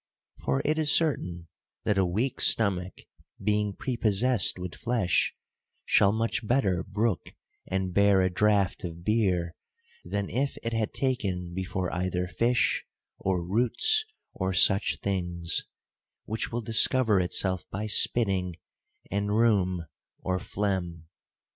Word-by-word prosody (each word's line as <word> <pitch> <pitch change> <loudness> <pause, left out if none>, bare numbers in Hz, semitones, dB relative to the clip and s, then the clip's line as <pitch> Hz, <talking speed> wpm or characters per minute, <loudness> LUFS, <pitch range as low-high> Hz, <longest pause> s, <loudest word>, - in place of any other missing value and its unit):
For 65 0 -1
it 155 +2 +1
is 150 -2 +3
certain 90 - +1 0.4
that 100 -2 +1
a 95 - +2
weak 110 +9 -2
stomach 95 -4 +3 0.4
being 105 0 0
prepossessed 115 -3 +2
with 90 -2 -6
flesh, 110 0 0 0.5
shall 100 - +4
much 115 +2 -2
better 100 -8 +1
brook 105 0 -2 0.3
and 95 -1 -2
bear 100 0 +4
a 95 0 +1
draught 100 -1 +1
of 85 -1 -7
beer, 90 -5 0 0.5
than 100 -1 -3
if 135 +5 -2
it 115 0 -3
had 110 -1 -2
taken 95 -10 -2
before 95 -1 -4
either 90 0 -2
fish, 120 +6 0 0.4
or 90 -3 -1
roots, 125 - +2 0.3
or 95 0 -2
such 95 +2 +3
things; 90 -3 -2 0.6
which 110 +1 -4
will 120 +1 -3
discover 115 -1 +3
itself 95 +1 -1
by 105 +3 -4
spitting, 100 -5 +4 0.6
and 100 +1 -1
rheum, 95 -7 +1 0.3
or 95 0 -2
phlegm. 90 -6 -3
100 Hz, 125 wpm, -27 LUFS, 90-115 Hz, 0.6 s, shall